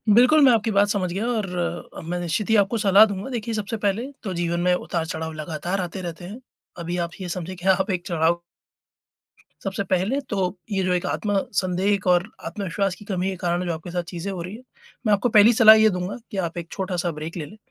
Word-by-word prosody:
बिल्कुल 250 +6 +6
मैं 260 - +7
आपकी 225 -1 +2
बात 205 0 +4
समझ 185 -4 -1
गया 200 +5 -2
और, 180 -9 -3
मैं 175 +2 -3
निश्चित 175 +5 -2
ही 225 - +4
आपको 205 +2 +3
सलाह 205 0 +6
दूँगा। 200 +2 -5
देखिए 230 -2 -3
सबसे 215 +1 -3
पहले, 210 +3 0 0.2
तो 190 -3 -3
जीवन 170 0 -1
में 180 0 +3
उतार-चढ़ाव 160 -2 -3
लगातार 160 +5 -3
आते 180 +2 -5
रहते 175 -1 -6
हैं। 205 +7 -8 0.4
अभी 175 +1 -3
आप 170 - -19
ये 180 - -5
समझिए 180 +1 -5
कि 180 +1 -6
आप 190 +2 +3
एक 180 -2 -2
चढ़ाव 170 0 +1 1.2
सबसे 195 0 -2
पहले 190 +9 +1
तो 205 - -1 0.3
ये 190 -1 0
जो 185 - +1
एक 180 - -1
आत्म-संदेह 195 -2 0
एक 200 - -2
और 180 +3 +3 0.2
आत्मविश्वास 195 -1 -2
की 210 - -14
कमी 190 -2 -1
के 190 - -3
कारण 175 0 -1
जो 170 - -1
आपके 160 +2 -7
साथ 175 0 -2
चीजें 175 +3 -5
हो 185 -3 -5
रही 180 +4 -6
हैं, 240 - -13 0.4
मैं 210 - +4
आपको 205 +4 +2
पहली 220 +3 +8
सलाह 220 -1 +9
ये 220 0 +5
दूँगा 180 +2 -3
कि 200 - -5
आप 175 -2 -2
एक 170 -1 -5
छोटा-सा 180 -3 -2
ब्रेक 155 +3 -7
ले 155 - -4
लें। 210 - -13
185 Hz, 225 wpm, -23 LUFS, 175-205 Hz, 1.2 s, सलाह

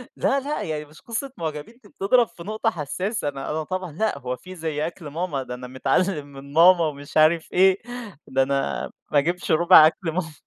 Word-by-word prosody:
لا، 275 - +1
لأ، 285 +2 -3
يعني 150 -1 -4
مش 150 +1 -18
قصة 240 +4 -4
معجبين 160 +8 -6
دي 205 - -17
بتضرب 230 +6 +2
في 170 - -12
نقطة 215 +3 -1
حساسة، 185 +3 -3
أنا 135 -1 -6
أنا 155 +1 -2
طبعًا 185 +1 -4
لأ 215 +8 -1
هو 125 0 -3
في 185 +8 -12
زي 160 -2 -2
أكل 170 -2 -9
ماما؟ 150 -2 -3
ده 125 - -7
أنا 125 0 -7
متعلِّم 145 +5 0
من 140 0 -12
ماما، 170 +1 +6
ومش 145 -1 -6
عارف 160 +1 +4
إيه، 190 +1 +5 0.5
ده 135 0 +2
أنا 135 0 -2 0.2
ما 150 - +3
أجيبش 175 +5 -1
رُبع 160 -1 +8
أكل 165 +1 -3
ماما. 165 -2 -3
160 Hz, 200 wpm, -24 LUFS, 145-185 Hz, 0.5 s, رُبع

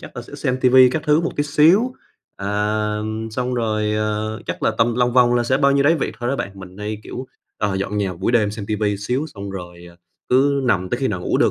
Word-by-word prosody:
chắc - - -12
là - - -5
sẽ - - -13
xem 125 - -1
ti 130 - +4
vi 130 0 +7
các 155 +3 -2
thứ 150 +1 +4
một 170 - -1
tí 145 - +2
xíu. 165 - +4 0.4
À, 100 - -6 0.5
ừm, 110 +1 -4
xong 125 +2 -2
rồi, 110 -2 0
ờ, 110 0 -2
chắc 85 - -5
là - - +3
tầm 115 +1 +2
lòng 125 0 +1
vòng 120 -1 +4
là 120 - +2
sẽ 130 +2 +1
bao 140 -1 +3
nhiêu 140 0 +3
đấy 155 +3 +5
việc 155 - -2
thôi 120 - -1
đó 135 - 0
bạn, 100 - -3
mình 95 0 -12
hay, 105 0 -4
kiểu, 130 +1 -7 0.3
ờ, 100 -2 0
dọn 100 +2 -2
nhà 100 -2 -1
buổi 95 +7 -1
đêm, 110 -4 +3
xem 105 -1 -6
ti 110 - -1
vi 105 -1 0
tí - - -3
xíu, 125 +9 -2
xong 100 -1 -6
rồi, 90 -2 -9
ờ, 85 - -20 0.3
cứ 140 +2 +3
nằm 95 -6 +1
tới - - -1
khi - - +1
nào - - -3
ngủ - - 0
được - - +4
115 Hz, 275 wpm, -20 LUFS, 105-130 Hz, 0.5 s, vi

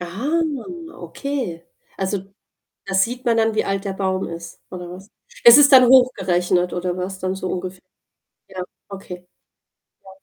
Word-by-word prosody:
Ah, 230 - -2 0.6
okay. 250 - -5 0.3
Also, 195 0 -4 0.5
da 195 - -5
sieht 240 +7 0
man 230 -1 +2
dann, 225 -1 +1
wie - - +1
alt 195 0 -2
der 195 - -3
Baum 190 -1 -2
ist 170 0 -9
oder 180 -1 -8
was? 190 +4 -12 0.3
Ist 235 +3 +10
es 285 -1 +7
dann 255 -2 +8
hochgerechnet 180 -8 +3
oder 180 0 -2
was 185 +1 -5
dann 185 0 -2
so 190 -1 -5
ungefähr? 185 0 -5 0.7
Ja, 185 -1 -6 0.3
okay. 180 -2 -10 0.8
Ja. 190 - -15
190 Hz, 155 wpm, -21 LUFS, 180-230 Hz, 0.8 s, Ist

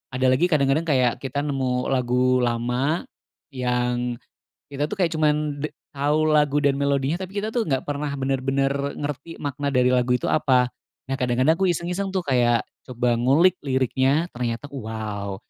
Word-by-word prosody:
ada 130 0 +2
lagi 135 +7 +3
kadang-kadang 145 +1 +2
kayak 130 -5 +2
kita 135 +1 -2
nemu 130 -3 -1
lagu 125 0 +2
lama, 125 +6 0 0.5
yang, 125 -1 -1 0.6
kita 140 +1 -1
tuh 210 - -3
kayak 175 -3 +2
cuman 150 -2 0
de 155 - -1 0.3
tahu 150 +2 +1
lagu 150 -1 +3
dan 140 -1 +2
melodinya 140 +2 0
tapi 190 +2 -5
kita 215 - -3
tuh 235 -2 +1
nggak 135 -3 0
pernah 145 0 -2
bener-bener 135 0 0 0.3
ngerti 145 +3 -5
makna 145 0 -3
dari 125 -1 +3
lagu 125 0 +2
itu 125 - -1
apa. 125 -4 +3 0.4
Nah, 135 - -1
kadang-kadang 130 +6 +2
aku 195 - +2
iseng-iseng 180 +4 -3
tuh 190 - 0
kayak, 120 -3 +3 0.2
coba 120 -1 0
ngulik 165 +9 +4
liriknya 135 +4 +1
ternyata 120 +3 -3
wow 110 -5 -5
135 Hz, 160 wpm, -23 LUFS, 125-150 Hz, 0.6 s, ngulik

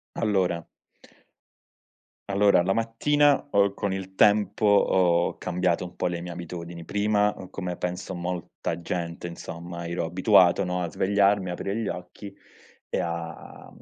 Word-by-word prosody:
Allora 95 -6 0 1.6
Allora, 100 -2 +4
la 95 - +1
mattina 140 +7 +2
ho 100 -2 +3
con 100 -2 -2
il 95 0 -5
tempo 105 +1 +3
ho 90 -4 +3
cambiato 90 0 -1
un 90 - -10
po' - - -1
le 85 -1 -2
mie 90 - -7
abitudini, 85 -1 -7
prima, 105 +2 +1
uhm, 95 -1 -10
come 90 -2 -4
penso 90 +1 -4
molta 90 -1 -4
gente, 85 0 -4
insomma, 85 0 -7
ero 85 -1 -2
abituato, 90 +2 +4
no, 90 0 -2
a 85 - -2
svegliarmi, 100 +2 +2
aprire 100 +3 -3
gli 115 -3 -2
occhi 95 +2 -7 0.6
e - - -2
a 85 -1 -6
90 Hz, 140 wpm, -26 LUFS, 85-100 Hz, 1.6 s, Allora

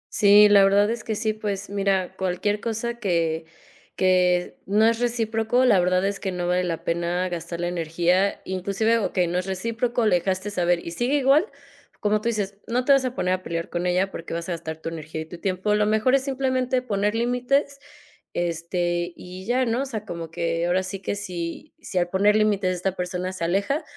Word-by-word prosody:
Sí, 210 -1 +7
la 200 -1 +6
verdad 200 +2 +4
es 235 -1 -4
que 220 - -2
sí. 215 +1 0
Pues, 205 -2 -4
mira, 195 -2 0
cualquier 190 +3 -1
cosa 235 +1 -3
que 165 -5 0 0.5
que 180 -1 +2
no 210 +3 +3
es 230 0 +1
recíproco, 230 +1 +1
la 210 -7 +5
verdad 180 +1 +2
es 200 0 -2
que 190 - -3
no 180 -1 -3
vale 180 +1 +1
la 170 -2 -3
pena 175 +2 -1
gastar 170 0 -5
la 175 - -1
energía, 175 +3 0
inclusive, 200 +5 0
okey 185 -3 0
no 175 +1 0
es 180 - -4
recíproco. 230 +5 -1
Le 195 -4 +4
dejaste 190 +3 -2
saber 175 -3 0
y 170 - -5
sigue 240 +10 0
igual, 285 +7 +4 0.5
como 210 0 +1
tú 235 - 0
dices, 200 -3 -2
no 245 +2 0
te - - +4
vas 275 -1 +5
a 255 0 -3
poner 185 0 0
a 185 0 -3
pelear 165 -1 -4
con 175 +1 -1
ella, 185 +2 +1
porque 165 0 -6
vas 170 +2 -4
a - - -1
gastar 160 -2 -5
tu - - -2
energía 160 -1 -6
y - - -6
tu 170 +2 -10
tiempo. 190 +3 0
Lo 210 0 +3
mejor 220 +4 +2
es 270 - +1
simplemente 260 -2 0
poner 210 -2 0
límites, 250 +4 0 0.6
este, 175 +1 -1
y 185 +1 -10
ya 250 +4 +1
¿no? 230 +3 0
O 275 - -1
sea, 220 -5 -5
como 170 -5 -6
que 165 0 -1
ahora 180 +2 +2
sí 190 +1 -5
que - - -1
si 180 - -6
si 185 - -6
al 175 0 0
poner 205 +3 +3
límites 205 -4 +2
esta 180 +1 -2
persona 180 0 -3
se 185 -3 -6
aleja, 200 - 0
195 Hz, 210 wpm, -24 LUFS, 175-225 Hz, 0.6 s, Sí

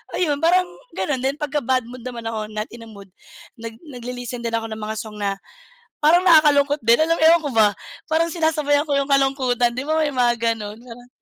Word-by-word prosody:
Ayun, 295 -5 0
parang 365 +2 +4 0.3
ganun. 275 -4 -2
Then 275 +2 -1
pagka-bad 260 -4 -1
mood 250 -1 -10
naman 235 -2 -6
ako, 215 -1 -5
not 215 +1 -4
in 230 -1 -10
a - - -14
mood, 200 -2 -13 0.5
nag 225 0 -8
nagli-listen 245 -3 -7
din 230 0 -3
ako 225 0 -2
ng 220 - -5
mga 215 +1 -4
song 215 -1 -8
na 195 -1 -1 0.6
parang 330 +4 +4
nakakalungkot 295 -3 +5
din, 230 +1 +5
alam 330 +1 +2
mo - - -7
yun, 320 - +7
ewan 335 - +1
ko 285 - -2
ba, 215 -2 +5 0.4
parang 330 +1 +2
sinasabayan 305 -3 +1
ko 290 - -3
yung 275 0 -1
kalungkutan, 260 -3 +2
di 255 - -3
ba, 315 +1 0
may 295 -2 -1
mga 240 -1 +2 0.2
gano'n. 210 -1 -8
Parang 245 0 -13
255 Hz, 215 wpm, -21 LUFS, 230-295 Hz, 0.6 s, yun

